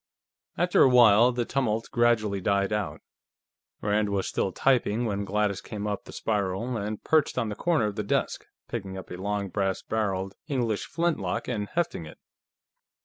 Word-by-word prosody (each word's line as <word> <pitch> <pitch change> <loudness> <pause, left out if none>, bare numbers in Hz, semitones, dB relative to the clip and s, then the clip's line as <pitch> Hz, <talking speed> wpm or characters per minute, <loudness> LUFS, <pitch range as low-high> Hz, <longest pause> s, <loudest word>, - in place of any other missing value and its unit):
After - - +3
a 135 - +7
while, 120 -1 +7
the 120 -1 -1
tumult 115 -4 -1
gradually 115 -5 +2
died 100 +1 +1
out. 105 -3 -2 0.8
Rand 105 0 +1
was 100 -1 -1
still 95 - -1
typing 120 -1 +2
when 100 -2 -2
Gladys 105 0 0
came 105 -1 -6
up 105 -1 -3
the - - -10
spiral 105 +3 -1
and 105 0 -4
perched 155 -4 +2
on 115 -3 0
the 105 - -4
corner 165 -2 +1
of 105 -1 -2
the 105 - -1
desk, 100 - -1 0.2
picking 95 -1 -5
up 95 - -9
a 90 - -5
long 100 +1 -2
brass 95 0 -1
barreled 95 -3 -2
English 120 -8 -1
flintlock 170 -1 -1
and 105 -4 -3
hefting 155 - -2
it. - - -12
105 Hz, 170 wpm, -27 LUFS, 100-120 Hz, 0.8 s, a